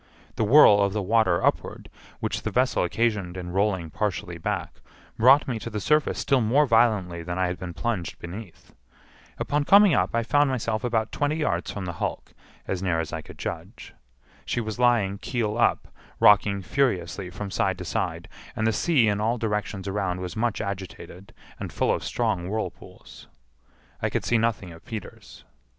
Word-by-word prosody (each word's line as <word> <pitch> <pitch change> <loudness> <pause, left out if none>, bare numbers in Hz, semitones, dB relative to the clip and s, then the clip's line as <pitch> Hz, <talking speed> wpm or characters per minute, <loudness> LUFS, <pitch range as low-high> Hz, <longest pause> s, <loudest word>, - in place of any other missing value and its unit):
The - - 0
whirl 105 -3 +7
of 100 -1 +1
the 105 - -1
water 95 -4 +2
upward, - - -1 0.3
which - - -2
the - - -3
vessel 130 -4 +1
occasioned 100 -2 -1
in 90 -1 -6
rolling 95 -4 0
partially 90 -4 -3
back, - - -4 0.3
brought 130 +5 +5
me 120 -4 -2
to 115 - -6
the 105 -1 -4
surface 150 +7 +1
still 135 -3 +2
more 130 +7 +3
violently 110 -8 +2
than 90 +1 -5
I 95 - +2
had 90 0 -3
been 90 -2 -7
plunged 110 -8 -3
beneath. 90 +2 -10 0.6
Upon 145 0 0
coming 200 +2 +6
up - - +1
I 115 - +1
found 145 +4 +3
myself 115 -4 -2
about 115 -3 0
twenty 145 +1 0
yards 120 - -1
from 100 -2 -5
the 90 - -4
hulk, - - -4 0.3
as 95 -2 -2
near 90 -4 0
as 80 -2 -4
I - - -3
could - - -13
judge. - - -7 0.5
She - - -2
was 110 -1 -4
lying 115 -5 +2
keel 110 -2 -2
up, 120 - +1 0.3
rocking 100 -1 +5
furiously 95 - -1
from 100 +2 -7
side 95 -1 0
to 90 - -7
side, - - -3 0.3
and 110 - -1
the 110 - +2
sea 135 -1 +3
in 105 0 0
all 115 +3 +1
directions 105 -3 -3
around 95 -2 -2
was 90 -2 -6
much 115 -1 -1
agitated, 95 -1 -7 0.3
and - - -5
full - - +1
of - - -3
strong 105 -7 -1
whirlpools. 110 +1 -7 0.7
I - - 0
could - - -2
see 120 - +2
nothing 110 -5 -1
of 85 - -14
Peters. 110 -4 -9
105 Hz, 180 wpm, -25 LUFS, 95-120 Hz, 0.7 s, whirl